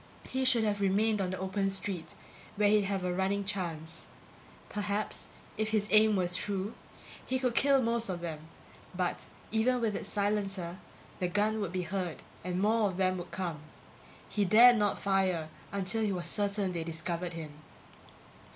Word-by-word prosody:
He 260 0 -1
should 240 -3 +4
have 205 -1 0
remained 205 +2 +2
on 185 - -1
the 185 - -3
open 195 +1 -1
street 190 -3 -4 0.4
where 205 0 +3
he'd 210 -1 +4
have 195 -1 -1
a 180 0 0
running 195 +2 0
chance. 170 -5 -3 0.6
Perhaps, 205 0 -3 0.3
if 220 0 +1
his 215 -1 +1
aim 215 0 +6
were 185 -2 +1
true, 195 +3 -2 0.5
he 260 - 0
could 255 -2 0
kill 275 +1 +4
most 230 -1 +1
of 180 -2 -2
them; 165 -3 -4 0.6
but, 180 -1 -2 0.2
even 240 +3 +2
with 220 -3 0
its - - -3
silencer, 195 -3 -1 0.4
the 180 - +1
gun 210 +3 +1
would 195 -4 -2
be 185 -1 -2
heard 180 -2 -3 0.2
and 180 0 -2
more 215 +2 +3
of 185 - -6
them 185 -1 +1
would 175 - -7
come. 175 -5 -3 0.7
He 210 - 0
dared 235 +5 +8
not 205 -1 +1
fire 185 -5 +1 0.2
until 200 +2 0
he 215 -2 +1
was 180 -3 -3
certain 200 +1 +1
they 170 -2 -3
discovered 170 +2 -3
him. 160 -2 -6
195 Hz, 170 wpm, -31 LUFS, 180-215 Hz, 0.7 s, dared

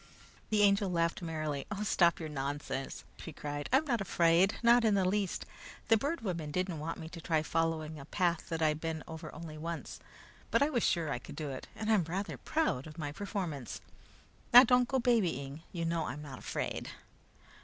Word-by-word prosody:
The 210 -1 +3
Angel 200 -1 +4
laughed 170 0 0
merrily. 155 -4 -3
"Oh 210 0 -3
stop 175 -4 +3
your 160 - -4
nonsense!" 140 -1 -4
she 165 - -8
cried. 145 -1 -5
"I'm 270 +5 +4
not 240 -7 0
afraid! 175 +1 +3
Not 235 +1 +6
in 215 -3 +4
the 190 -2 +2
least! 195 0 0 0.4
The 225 - +7
Bird 285 +9 -1
Woman 170 -8 -3
didn't 180 0 -2
want 160 +2 -4
me 160 - -7
to 165 0 -9
try 160 -2 +1
following 160 -1 -1
a 140 - -9
path 175 0 0
that 165 -1 -1
I'd 155 0 +2
been 160 -1 -3
over 160 -1 -7
only 155 -1 -8
once, 165 +1 -5 0.5
but - - +4
I 300 - +1
was 240 -5 +1
sure 165 -4 +1
I - - -1
could - - -10
do 150 -3 -4
it, 130 - -7
and 220 0 -1
I'm 200 -6 +4
rather 190 +5 -3
proud 305 - 0
of 155 - -10
the 150 -3 -4
performance. 180 - -4 0.7
Now, 245 +2 +12
don't 250 0 +4
go 265 - +1
babying! 170 - +1
You 170 -2 -3
know 165 -1 0
I'm 150 - -5
not 135 -4 -8
afraid!" - - -3
165 Hz, 195 wpm, -32 LUFS, 155-205 Hz, 0.7 s, Now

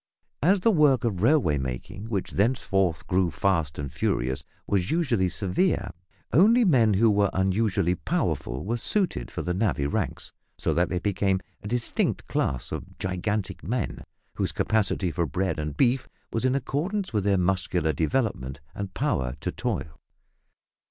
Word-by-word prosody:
As 185 +5 +4
the 225 - +4
work 150 - +4
of 100 -7 -1
railway 115 - +3
making, 65 - -5
which 100 -5 -2
thenceforward 95 -6 +1
grew 90 -1 +2
fast 85 -4 0
and 70 -2 -5
furious, 65 -3 -1 0.2
was 100 -2 +2
unusually 125 - +1
severe, 95 - 0 0.4
only 220 - +6
men 115 - +4
who 110 +3 +4
were 100 -1 +3
unusually 95 -1 +1
powerful 65 -6 -2
were 115 +4 -1
suited 180 - 0
for - - -5
the 90 - -1
navvy 95 -7 0
ranks, 70 - -2 0.3
so - - 0
that 85 +1 +2
they 90 - -1
became 95 0 +1 0.2
a 105 - -7
distinct 120 +2 0
class 65 -3 -1
of - - -6
gigantic 95 +2 -2
men, 120 +1 -2 0.3
whose - - 0
capacity 100 -4 +1
for 85 0 -1
bread 95 +1 -1
and 75 -1 -4
beef 130 0 +2 0.2
was 115 +2 0
in 130 +1 +3
accordance 175 - -2
with 105 -3 +1
their 100 -1 +3
muscular 90 -3 +1
development 80 - -1
and 100 -2 -6
power 95 - 0
to - - -3
toil. 75 -3 -4
100 Hz, 155 wpm, -26 LUFS, 90-120 Hz, 0.4 s, only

